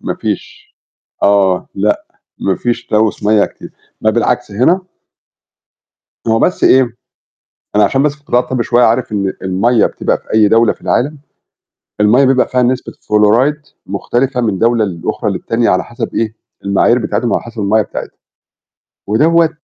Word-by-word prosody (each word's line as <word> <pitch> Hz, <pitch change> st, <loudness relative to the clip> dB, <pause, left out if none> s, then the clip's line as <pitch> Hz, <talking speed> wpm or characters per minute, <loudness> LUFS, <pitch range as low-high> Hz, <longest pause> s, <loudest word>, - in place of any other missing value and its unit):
ما -, -, -3 dB
فيش 425 Hz, -1 st, -6 dB, 0.5 s
آه، 95 Hz, -2 st, +2 dB
لأ، 105 Hz, +2 st, 0 dB, 0.3 s
ما 95 Hz, -2 st, -1 dB
فيش 120 Hz, -1 st, -2 dB
تلوث 110 Hz, 0 st, 0 dB
مَيّة 105 Hz, 0 st, +4 dB
كتير، -, -, -10 dB, 0.3 s
ما 110 Hz, -, +2 dB
بالعكس 120 Hz, 0 st, -1 dB
هنا 130 Hz, -, +2 dB, 1.5 s
هو 115 Hz, 0 st, +2 dB
بس 180 Hz, -, +1 dB
إيه، 125 Hz, -3 st, +4 dB, 0.8 s
أنا 105 Hz, -, +5 dB
عشان 135 Hz, +5 st, +2 dB
بس 150 Hz, -, +1 dB
في 150 Hz, -, -27 dB
القطاع 125 Hz, -3 st, +1 dB
الطبي 125 Hz, -1 st, -2 dB
شوية 120 Hz, +1 st, +2 dB
عارف 120 Hz, +1 st, +1 dB
إن 100 Hz, -2 st, -1 dB
المَيّة 100 Hz, +5 st, +2 dB
بتبقى -, -, -1 dB
في -, -, -11 dB
أي 110 Hz, -1 st, +5 dB
دولة 115 Hz, +2 st, +3 dB
في -, -, -25 dB
العالم، 150 Hz, +5 st, 0 dB, 0.8 s
المَيّة 110 Hz, +6 st, +4 dB
بيبقى 130 Hz, -1 st, +2 dB
فيها 125 Hz, 0 st, +1 dB
نسبة 125 Hz, +1 st, -1 dB, 0.2 s
فلوريد، 115 Hz, +8 st, +3 dB, 0.3 s
مختلفة 125 Hz, +6 st, -1 dB
من 105 Hz, -5 st, -1 dB
دولة 115 Hz, 0 st, +2 dB
لأخرى 85 Hz, -5 st, -3 dB
للتانية 115 Hz, -1 st, 0 dB
،على 95 Hz, -, +1 dB
حسب 120 Hz, -, -6 dB
إيه 110 Hz, -1 st, -1 dB, 0.3 s
المعايير 100 Hz, +5 st, +3 dB
بتاعتهم، 120 Hz, +1 st, -2 dB
وعلى -, -, 0 dB
حسب 115 Hz, -1 st, -8 dB
المَيّة 105 Hz, +2 st, +2 dB
بتاعتهم، 95 Hz, -, -8 dB, 0.9 s
ودوّة 160 Hz, +10 st, +3 dB
115 Hz, 155 wpm, -14 LUFS, 105-125 Hz, 1.5 s, أنا